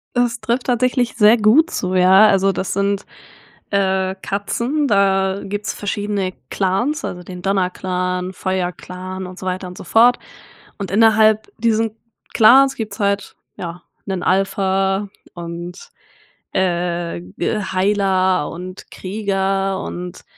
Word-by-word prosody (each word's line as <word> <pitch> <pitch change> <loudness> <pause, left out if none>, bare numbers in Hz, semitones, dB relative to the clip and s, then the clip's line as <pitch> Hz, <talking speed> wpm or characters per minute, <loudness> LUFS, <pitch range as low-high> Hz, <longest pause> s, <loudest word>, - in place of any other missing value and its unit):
Es 240 -1 +1
trifft 235 +3 -1
tatsächlich 250 0 +1
sehr 220 +1 +6
gut 235 +11 +4
zu, 185 0 -2
ja. 190 +3 +6
Also, 195 -1 +3
das 190 -1 -3
sind, 200 0 0 0.7
äh, 190 -1 +1
Katzen 235 +9 -1
da 195 -2 +2
gibt's 205 +1 -4
verschiedene 205 -2 -2 0.2
Clans, 240 - 0
also 180 0 -6
den 180 0 -9
Donnerclan, 180 -1 -1
Feuerclan 185 0 -4
und 180 0 -11
so 185 - -8
weiter 185 0 -3
und 180 - -10
so - - -8
fort 240 +5 +5 0.6
und 195 -2 -5
innerhalb 220 0 +4
diesen 225 -1 +1 0.4
Clans 265 +5 +6
gibt's 215 -3 -6
halt, 200 0 -1 0.2
ja, 175 0 -7 0.2
'nen 190 -3 -3
Alpha 195 +1 +1 0.3
und, 175 +1 -8 0.6
äh, 175 - -1
äh, 90 - -3
Heiler 190 -3 +1
und 180 +2 -9
Krieger 195 -1 -1
und 180 0 -7
195 Hz, 125 wpm, -19 LUFS, 185-215 Hz, 0.7 s, sehr